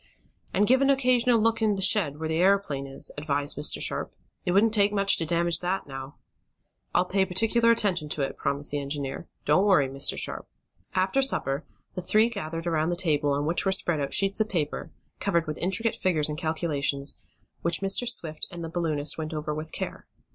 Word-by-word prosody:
"And 205 +2 +2
give 260 +4 +4
an 275 - +3
occasional 250 -3 +3
look 230 +1 +1
in 215 -2 +2
the 195 - -4
shed, 165 -9 +3
where 160 +1 -3
the 160 0 -1
aeroplane 180 -8 +2
is," 135 - -6
advised 145 -1 -1
Mr. 150 - +2
Sharp. - - 0 0.3
"It - - +1
wouldn't 210 +4 +3
take 205 -2 +3
much 200 -1 +2
to 165 - -2
damage 170 0 +1
that, 185 +2 -2
now." 135 0 -8 0.8
"I'll 180 - +2
pay 190 +1 +1
particular 225 +5 +2
attention 190 -9 +2
to 145 - -2
it," 135 - -3
promised 140 +1 -3
the 145 - -1
engineer. 140 -1 -5 0.2
"Don't 150 +6 +4
worry, 165 -9 +4
Mr. 135 +1 -1
Sharp." - - 0 0.5
After 190 +8 +2
supper 145 - 0 0.3
the 180 - -4
three 215 +5 +3
gathered 165 -7 -5
around 160 -1 0
the 175 - 0
table 150 -5 +1
on 145 +1 -1
which 165 +3 +1
were 195 - +1
spread 175 -4 0
out 140 - -3
sheets 195 +1 +2
of 220 0 +1
paper, 155 -7 -3 0.3
covered 170 -4 +1
with 155 -1 -5
intricate 195 +6 +1
figures 155 -5 0
and 150 - -3
calculations, 150 -4 -1 0.4
which 170 +1 +1
Mr. 195 +5 +3
Swift 160 -10 -1
and 175 -1 -8
the 165 - -5
balloonist 160 -3 0
went 155 0 -4
over 150 0 -3
with 155 +1 -6
care. - - -6
170 Hz, 200 wpm, -26 LUFS, 150-200 Hz, 0.8 s, give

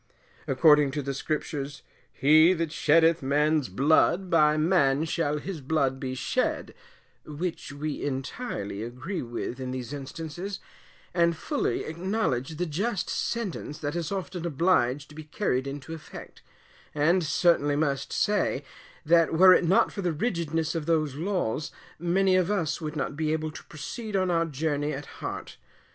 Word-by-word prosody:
According 150 +1 +5
to 145 -1 -2
the 140 +1 -3
Scriptures, 145 0 -4 0.3
"He 155 +6 +5
that 165 -3 -2
sheddeth 165 +1 +4
man's 150 0 +1
blood, 160 - +3
by 150 -2 +4
man 155 -3 +3
shall 155 -2 -1
his 165 +1 -6
blood 135 -2 0
be 130 -1 -4
shed," 125 - -1 0.5
which 160 +1 -5
we 145 +1 -4
entirely 130 - -4
agree 125 - -5
with 120 +1 -5
in 130 -1 -4
these 130 +1 -5
instances, 165 +7 -6 0.5
and 170 -1 +2
fully 290 - -1
acknowledge 165 - -2
the 175 +3 -1
just 190 +5 -2
sentence 200 -10 -3
that 145 +2 -4
is 170 -3 -3
often 185 -3 -4
obliged 145 -4 +1
to - - -13
be 155 0 -8
carried 140 -5 -1
into 140 +3 -6
effect; 160 - -10 0.5
and 170 +5 +3
certainly 145 -1 +2
must 140 -2 -1
say, 205 -9 +1 0.4
that 165 +1 +4
were 185 +2 +8
it 180 - +3
not 180 +3 +3
for 200 - -5
the 180 -2 0
rigidness 165 -4 -1
of 165 -2 -3
those 155 -4 +1
laws, 155 - -2 0.3
many 185 +3 +2
of 185 -1 +2
us 170 -7 -1
would 155 0 -4
not 150 0 -2
be 155 0 -1
able 155 0 -1
to - - -10
proceed 210 - -6
on 185 -2 +2
our 165 -1 +2
journey 150 0 -1
at 140 +1 -6 0.2
heart. - - -6
155 Hz, 155 wpm, -27 LUFS, 145-175 Hz, 0.5 s, were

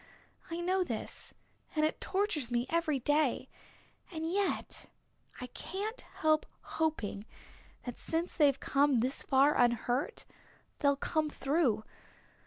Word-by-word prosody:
I 335 +1 -3
know 370 +2 +2
this, 230 -10 -5 0.4
and 305 0 +3
it 310 - -1
tortures 380 - 0
me 240 0 +1
every 330 -3 +2
day. 290 +1 +1 0.6
And 320 -2 -3
yet 390 +3 -1 0.5
I 250 - -4
can't 400 - -4
help 310 -1 +1
hoping 230 -10 -2 0.6
that 245 -2 -6
since 330 +2 -1
they've 285 -4 +4
come 275 -3 +3
this 260 +3 0
far 275 +2 +4
unhurt 245 - +1 0.5
they'll 280 -1 +4
come 310 +2 0
through. 270 -7 +1
295 Hz, 120 wpm, -32 LUFS, 250-335 Hz, 0.6 s, they've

